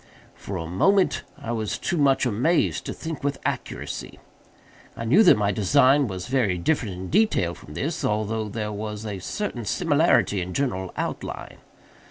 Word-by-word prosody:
For 95 - -6
a 85 - -4
moment 185 - +2 0.2
I 115 - -5
was 110 -3 -2
too - - -2
much 135 -3 +3
amazed 125 +9 +1
to - - -3
think 160 -4 -6
with 140 -1 0
accuracy. - - -4 0.8
I 115 - -4
knew 150 - +5
that 220 - +7
my 105 -1 +1
design 130 +7 +4
was 95 -3 -5
very 120 -8 +1
different 105 - 0
in 90 0 -7
detail 185 - +2
from - - -12
this—although 110 +1 -1
there 105 0 -3
was 105 +1 -5
a 100 -3 -4
certain 120 - -4
similarity 100 -1 +2
in 90 +1 -5
general 95 -10 -1
outline. - - -5
110 Hz, 160 wpm, -24 LUFS, 100-140 Hz, 0.8 s, that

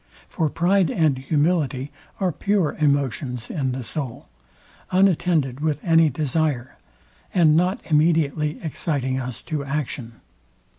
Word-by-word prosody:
For 160 -2 -1
pride 180 +2 +2
and 150 -5 +1
humility 145 -1 0 0.3
are 185 -3 +1
pure 195 +1 0
emotions 135 -4 0
in 135 -6 -1
the 130 0 -4
soul, 130 0 -6 0.6
unattended 175 -8 +2
with 150 -1 0
any 165 -2 +5
desire, 145 -2 -1 0.6
and 160 -4 +5
not 180 +4 +2
immediately 155 -1 +1
exciting 135 -4 -2
us 125 -2 -6
to 150 -3 -3
action. 140 -4 -4
150 Hz, 115 wpm, -23 LUFS, 135-165 Hz, 0.6 s, any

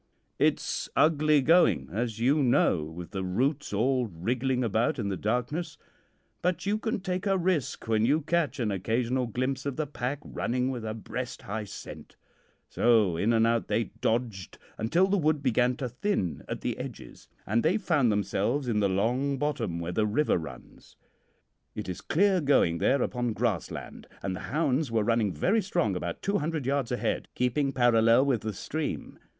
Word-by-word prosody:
"It's - - 0
ugly 155 -2 +4
going, 160 - +4
as 115 +3 -2
you 135 +6 +3
know, 120 - +3
with 85 +2 -8
the 95 -2 -3
roots 130 +11 -1
all 125 +4 +1
wriggling 125 +8 -1
about 115 +4 +1
in 105 -5 -2
the 95 - -1
darkness, 125 - -2 0.6
but 180 +2 -1
you 210 +2 +1
can 220 -3 -2
take 185 +1 -2
a 195 -1 +3
risk 170 -10 -1
when 110 -1 +2
you 145 +7 +3
catch 155 -2 0
an 110 -4 0
occasional 120 +6 0
glimpse 130 +3 -2
of 140 -2 -3
the 155 - -1
pack 135 -1 -3
running 125 +2 -1
with 120 -3 -5
a 110 0 -3
breast 110 - -6
high 105 +2 -4
scent; - - -10 0.5
so 110 -7 +3
in 100 +7 +1
and 115 -1 +4
out 115 0 +1
they 115 - -1
dodged 110 -5 -1 0.2
until 160 +13 +2
the 195 +1 +1
wood 155 -2 +1
began 125 0 +2
to 130 0 -3
thin 125 - -2
at - - -5
the - - -3
edges, - - -9 0.2
and 110 +4 +1
they 170 - +2
found 155 - +2
themselves 105 +6 0
in 110 -3 +1
the 100 -1 +2
long 125 +9 0
bottom 135 - -2
where 85 +1 -3
the 105 +3 +1
river 125 -1 +2
runs. 80 - -11 0.8
It - - -5
is 90 - -5
clear 190 +1 +2
going 110 - +3
there 135 +7 +2
upon 120 -2 -1
grassland, - - -3 0.2
and 95 -1 -2
the - - -6
hounds 145 -1 +1
were 115 -2 +1
running 115 -2 +1
very 195 - +1
strong 110 - 0
about 85 -1 -4
two 200 +1 +1
hundred 155 -2 -2
yards 135 -2 0
ahead, 125 - -1
keeping 130 +3 +1
parallel 120 0 +4
with 130 -6 +1
the 110 -1 -3
stream. 155 +10 -4
125 Hz, 180 wpm, -28 LUFS, 110-150 Hz, 0.8 s, ugly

